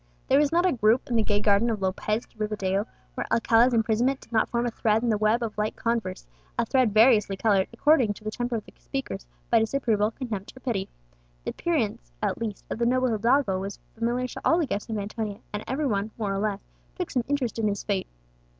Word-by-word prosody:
There 270 Hz, -, +6 dB
was 295 Hz, -1 st, +3 dB
not 345 Hz, +2 st, +3 dB
a 370 Hz, -, +4 dB
group 235 Hz, 0 st, +2 dB
in -, -, +1 dB
the 225 Hz, -, +4 dB
gay 205 Hz, -1 st, +1 dB
garden 205 Hz, +2 st, +3 dB
of 220 Hz, -2 st, -1 dB
Lopez 195 Hz, +4 st, -1 dB
de -, -, -31 dB
Rivadeo 210 Hz, -1 st, -1 dB, 0.3 s
where -, -, -4 dB
Alcala's 230 Hz, +2 st, +4 dB
imprisonment 235 Hz, +3 st, +2 dB
did -, -, -18 dB
not 220 Hz, -1 st, +2 dB
form 235 Hz, 0 st, 0 dB
a 240 Hz, -, -1 dB
thread 220 Hz, 0 st, +1 dB
in 240 Hz, -, +1 dB
the 215 Hz, -, +2 dB
web 215 Hz, +3 st, +2 dB
of 220 Hz, -2 st, -4 dB
light 210 Hz, +1 st, -1 dB
converse, 230 Hz, -, -2 dB, 0.3 s
a -, -, +2 dB
thread 255 Hz, -5 st, +3 dB
variously 215 Hz, -3 st, +5 dB
coloured, 200 Hz, -3 st, +3 dB
according 240 Hz, -3 st, +3 dB
to -, -, -14 dB
the 215 Hz, -, -3 dB
temper 240 Hz, +1 st, -2 dB
of 220 Hz, -, -4 dB
the -, -, -14 dB
speakers, -, -, -5 dB, 0.2 s
by -, -, +6 dB
disapproval, 220 Hz, -3 st, +1 dB
contempt, 225 Hz, -2 st, -6 dB
or -, -, -9 dB
pity. 225 Hz, -7 st, -2 dB, 0.5 s
The -, -, -3 dB
appearance, 225 Hz, -, -1 dB
at -, -, -1 dB
least, 215 Hz, -3 st, -4 dB
of -, -, -3 dB
the 235 Hz, -, +2 dB
noble 255 Hz, +1 st, +2 dB
hidalgo 230 Hz, -2 st, +2 dB
was 195 Hz, +1 st, -5 dB, 0.2 s
familiar 240 Hz, +2 st, -1 dB
to -, -, -7 dB
all 330 Hz, -, +4 dB
the 340 Hz, -, +2 dB
guests 210 Hz, -6 st, -4 dB
of 220 Hz, -, -2 dB
Antonia, 210 Hz, 0 st, -4 dB, 0.2 s
and 210 Hz, -, -3 dB
every 290 Hz, +4 st, -1 dB
one, 210 Hz, -4 st, 0 dB
more 205 Hz, -3 st, -1 dB
or 195 Hz, -, -1 dB
less, 205 Hz, -1 st, -1 dB, 0.3 s
took 360 Hz, -3 st, -4 dB
some 250 Hz, -, +1 dB
interest 260 Hz, -6 st, -1 dB
in 220 Hz, -, +2 dB
his 200 Hz, -1 st, -2 dB
fate. 195 Hz, -3 st, -1 dB
225 Hz, 230 wpm, -26 LUFS, 205-245 Hz, 0.5 s, There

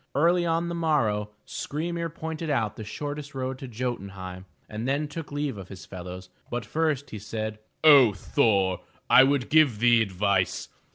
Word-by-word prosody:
Early 170 Hz, +4 st, +3 dB
on 165 Hz, +1 st, +1 dB
the 170 Hz, -, -3 dB
morrow, 120 Hz, -11 st, +1 dB, 0.2 s
Skry'mir 170 Hz, +3 st, -3 dB
pointed 160 Hz, 0 st, -5 dB
out 110 Hz, -7 st, 0 dB
the 110 Hz, -, -7 dB
shortest 145 Hz, +6 st, -6 dB
road 130 Hz, 0 st, -3 dB
to 135 Hz, -, -7 dB
Jo'tun 120 Hz, -4 st, -4 dB
heim, 95 Hz, -1 st, -8 dB, 0.2 s
and 110 Hz, +3 st, -5 dB
then 145 Hz, +3 st, 0 dB
took 155 Hz, +1 st, -7 dB
leave 145 Hz, -6 st, -2 dB
of 95 Hz, -, -9 dB
his 95 Hz, -1 st, -10 dB
fellows. 90 Hz, 0 st, -8 dB, 0.2 s
But 120 Hz, -2 st, -3 dB
first 150 Hz, +2 st, -1 dB
he 110 Hz, -, -6 dB
said: 110 Hz, +1 st, -4 dB, 0.3 s
0 135 Hz, -8 st, +8 dB
Thor, 100 Hz, -3 st, +1 dB, 0.3 s
I 130 Hz, -, +9 dB
would 135 Hz, -2 st, +1 dB
give 155 Hz, -8 st, +5 dB
thee 120 Hz, +1 st, +5 dB
advice. 100 Hz, -2 st, 0 dB
125 Hz, 170 wpm, -26 LUFS, 105-150 Hz, 0.3 s, I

